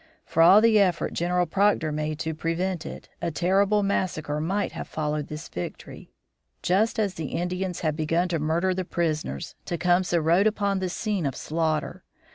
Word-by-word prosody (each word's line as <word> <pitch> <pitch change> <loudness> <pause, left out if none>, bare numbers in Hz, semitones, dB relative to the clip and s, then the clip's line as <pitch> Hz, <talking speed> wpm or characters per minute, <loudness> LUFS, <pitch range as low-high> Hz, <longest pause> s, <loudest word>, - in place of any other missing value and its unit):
For 165 - +1
all 190 +5 +8
the 225 -1 +5
effort 185 -4 +1
General 180 +1 +1
Proctor 190 -2 +2
made 155 0 -2
to 160 0 -2
prevent 165 +2 -2
it, - - -9
a 170 - 0
terrible 195 +6 +2
massacre 155 -6 -1
might 195 +6 -1
have - - -6
followed 150 -1 -2
this 150 +1 -7
victory. 90 - -7 0.5
Just 200 +6 +2
as 205 -4 0
the 160 -5 -5
Indians 180 +1 -2
had 155 -3 0
begun 165 +3 +1
to 165 -2 0
murder 165 +5 +1
the 185 0 -2
prisoners, 155 - -2
Tecumseh 175 0 +1
rode 170 +6 +3
upon 200 -2 0
the 185 -1 -2
scene 195 -4 -1
of 135 - -3
slaughter. 160 -1 -2
175 Hz, 170 wpm, -26 LUFS, 155-190 Hz, 0.5 s, all